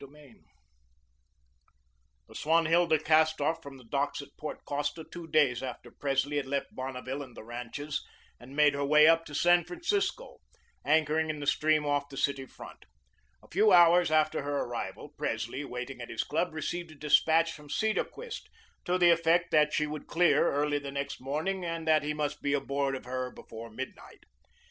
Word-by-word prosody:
CONCLUSION 140 -2 -16 1.8
The - - -15
"Swanhilda" 165 +1 +3
cast 155 +1 +3
off 165 0 0
from 140 -3 -10
the 130 - -15
docks 140 +4 -2
at - - -18
Port 155 - -7
Costa 145 +3 -3
two 170 +1 -10
days 145 -6 +2
after 125 -2 -7
Presley 140 +1 -1
had 140 - -2
left 140 0 -3
Bonneville 130 +1 -5
and 130 -4 -11
the - - -8
ranches 125 +6 -5 0.4
and 130 +3 -12
made 150 -1 +5
her 140 0 -2
way 150 +2 +6
up 165 0 +4
to 145 - -8
San 175 +3 +4
Francisco, 355 +4 -2 0.4
anchoring 155 +1 +2
in 155 -1 -3
the 145 - -5
stream 155 +1 +2
off 145 -1 0
the 135 - -10
City 135 -1 -1
front. - - -13 0.6
A - - -17
few 210 +4 +3
hours 175 -1 +6
after 155 0 +2
her 145 0 -2
arrival, 115 +1 -5
Presley, 120 -1 -3
waiting 125 -1 -6
at 120 - -7
his 110 - -2
club, 165 +4 -1
received 170 +2 -4
a 155 - -13
despatch 160 +3 +3
from 150 -2 -12
Cedarquist 220 - -2 0.4
to 180 +1 +1
the 175 -1 +6
effect 170 +1 +2
that 150 -1 +4
she 150 - +1
would 150 0 -6
clear 175 0 +3
early 145 0 0
the 140 -1 -7
next 140 -1 -4
morning 155 +8 -2
and 165 -1 -4
that 155 -1 +5
he 150 +1 -3
must 150 -1 -3
be 140 - 0
aboard 140 -1 -1
of 130 - -8
her 130 0 -3
before 115 -1 -10
midnight. 130 +5 -9
150 Hz, 180 wpm, -29 LUFS, 140-160 Hz, 1.8 s, way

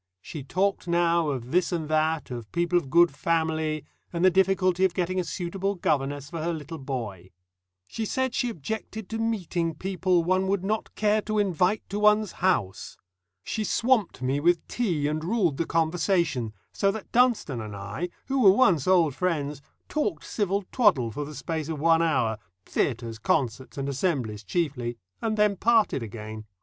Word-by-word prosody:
She 145 - -8
talked 185 +7 0
now 170 -1 +2
of 130 -3 -4
this 180 +2 +2
and 165 -3 -2
that, 155 -1 0
of 120 -3 -7
people 175 +1 0
of 170 -6 +1
"good 170 +3 +5
family," 155 0 -1 0.3
and 170 +1 +1
the 185 - +6
difficulty 190 0 +2
of 185 -2 +2
getting 185 +1 0
a - - +1
suitable 190 +3 -3
governess 145 -4 -1
for 165 - -4
her 170 +2 -1
little 160 +1 -7
boy. 115 -10 -5 0.6
She 220 - -4
said 260 +2 -1
she 245 - 0
objected 220 +2 -5
to 225 - -3
meeting 180 -7 -1
people 185 0 +1
"one 185 +2 +1
would 195 -1 0
not 215 +2 -2
care 215 0 +2
to 215 0 -2
invite 195 0 +1
to 205 - -2
one's 210 -1 +4
house." 125 - -1 0.5
She 220 - -2
swamped 220 - +1
me 135 +2 +1
with 170 +2 +2
tea 175 -12 -1
and 155 +1 -2
ruled 175 -6 +1
the 165 - -1
conversation, 160 - 0 0.2
so 195 - +2
that 210 0 -5
Dunstone 235 - +2
and 105 -2 -7
I, 100 - -4 0.2
who 270 0 0
were 200 - +8
once 190 - +4
old 175 -6 +4
friends, 150 -4 -2 0.3
talked 205 - -1
civil 200 -1 -1
twaddle 175 - +3
for 145 +6 -4
the 150 +1 -9
space 155 +3 -4
of 155 -3 -3
one 165 +1 +4
hour 125 -9 +1 0.3
theatres, 115 -3 -2
concerts, 125 +2 -1
and 140 0 -2
assemblies 130 - -1
chiefly 125 - -2 0.2
and 220 -1 -1
then 210 -2 +3
parted 225 - +3
again. 110 -1 -7
170 Hz, 175 wpm, -26 LUFS, 140-195 Hz, 0.6 s, were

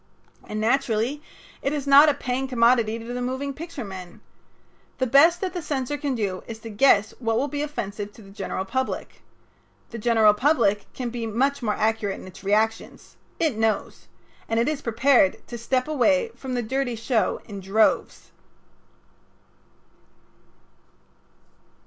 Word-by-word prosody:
And 215 - -4
naturally 240 +3 0 0.4
it 275 - -1
is 285 -2 -3
not 285 +2 +8
a 290 - +1
paying 255 +1 -2
commodity 235 -3 +3
to 230 - -9
the 250 - -3
moving 260 +3 -3
picture 320 -2 -7
men. 185 -3 -9 0.8
The 260 - +1
best 285 +8 +5
that 375 -2 -2
the 355 - -4
censor 285 -2 -2
can 285 -2 -2
do 195 -5 -2
is 230 - -6
to 225 - -8
guess 210 -2 +4
what 225 -2 0
will 270 +4 +1
be 290 +1 -4
offensive 210 -8 -4
to 220 - -15
the 195 - -14
general 195 -1 -4
public. 260 +6 -3 0.7
The 230 - -6
general 220 -2 +4
public 210 -5 +1
can 245 -2 -4
be 235 -1 -4
much 270 +6 0
more 215 -3 0
accurate 215 -2 -1
in - - -11
its 185 +1 -13
reactions. 215 +3 -1 0.2
It 295 -10 0
knows. 220 -1 -1 0.4
And 225 0 +1
it 235 - +1
is 300 -1 -1
prepared 235 -4 +2
to 240 - -8
stay 255 +2 0
away 300 - +2
from 260 -2 -5
the 245 - -1
dirty 260 +1 -2
show 225 0 0
in 200 -2 -8
droves. 195 +3 0
240 Hz, 155 wpm, -24 LUFS, 215-275 Hz, 0.8 s, not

